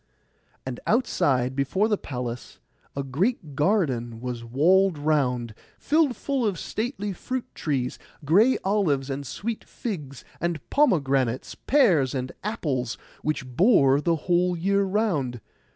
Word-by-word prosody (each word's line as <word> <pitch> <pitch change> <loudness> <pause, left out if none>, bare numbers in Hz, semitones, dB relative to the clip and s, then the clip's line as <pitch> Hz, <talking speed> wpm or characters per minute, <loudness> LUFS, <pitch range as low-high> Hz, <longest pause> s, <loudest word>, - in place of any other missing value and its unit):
And 130 -2 -5
outside 130 - +1
before 145 +10 +1
the 215 - +2
palace 125 - -6 0.4
a 140 - -2
great 155 - -1
garden 135 - +1
was 120 -1 -5
walled 170 +9 +3
round, 130 -6 0 0.2
filled 300 -4 +2
full 275 -3 -1
of 205 -5 0
stately 215 -2 -3
fruit 255 +7 -4
trees, 130 -5 -2 0.3
gray 210 - +5
olives 155 -9 +1
and 140 0 -4
sweet 225 - -4
figs, 150 - -6
and 170 -2 -1
pomegranates, 135 - +2
pears, 180 - +3
and 130 0 -3
apples, 145 - -2 0.2
which 155 -3 -2
bore 140 - +4
the 170 +1 +2
whole 180 0 +2
year 200 +4 +2
round. 185 - 0
155 Hz, 125 wpm, -25 LUFS, 130-205 Hz, 0.4 s, gray